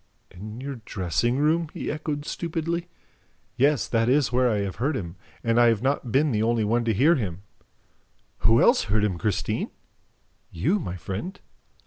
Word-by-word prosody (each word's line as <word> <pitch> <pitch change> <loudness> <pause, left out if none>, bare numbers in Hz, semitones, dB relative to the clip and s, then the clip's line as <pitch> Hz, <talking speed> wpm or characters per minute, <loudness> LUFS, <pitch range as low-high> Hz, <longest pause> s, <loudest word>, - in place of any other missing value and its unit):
"In 105 +5 -9
your 135 0 -5
dressing 105 +6 -1
room?" 160 +3 +2
he - - -3
echoed 150 -1 -4
stupidly. 170 +1 -3 0.7
"Yes, 140 +2 +2
that 115 0 +1
is 135 -2 +3
where 125 0 +3
I 105 -3 0
have 100 -2 -4
heard 140 +4 0
him; 85 -3 -6 0.3
and 115 0 +2
I 120 - +6
have 115 -1 +2
not 135 -3 0
been 145 +4 +3
the 105 -2 +1
only 115 0 +1
one 115 +3 +1
to 115 - +2
hear 145 - +5
him." 95 - -3 1.0
"Who 115 +4 +4
else 245 - +4
heard 105 +1 +1
him, 95 -5 -1
Christine?" 105 0 -1 0.8
"You, 160 - 0
my 90 - -5
friend." 95 - -6
120 Hz, 170 wpm, -25 LUFS, 105-145 Hz, 1.0 s, I